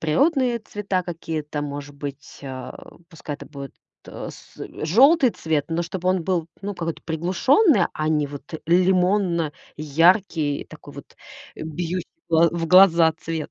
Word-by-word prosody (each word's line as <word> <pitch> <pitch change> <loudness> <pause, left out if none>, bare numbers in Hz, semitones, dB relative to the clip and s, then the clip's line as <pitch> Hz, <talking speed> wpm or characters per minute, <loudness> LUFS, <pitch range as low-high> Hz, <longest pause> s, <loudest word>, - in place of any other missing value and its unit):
природные 250 - +2
цвета 205 -4 -3
какие-то 160 -3 -5
может 145 0 -6
быть, 140 0 -8
а, 130 -2 -9
пускай 160 -3 -7
это - - -11
будет, 140 -2 -9 0.3
а, - - -7
с, - - -16
э, - - -7
желтый 265 - +5
цвет, 155 -7 -2
но 165 +1 -1
чтобы 180 +1 -3
он 185 -1 +1
был, 175 -3 0 0.2
ну, 205 +1 -4
какой-то 165 -2 -5
приглушённый, 190 - +3
а 155 - -2
не 150 -2 +1
вот 145 +3 -10
лимонно-яркий, 170 -3 +1
такой - - -13
вот, - - -12 0.4
а, - - -10
бьющий 170 +3 -4 0.2
в - - -43
гла 165 +1 +5
в 170 -1 -3
глаза 170 -2 +6
цвет. 160 -2 -5
165 Hz, 150 wpm, -23 LUFS, 155-185 Hz, 0.4 s, глаза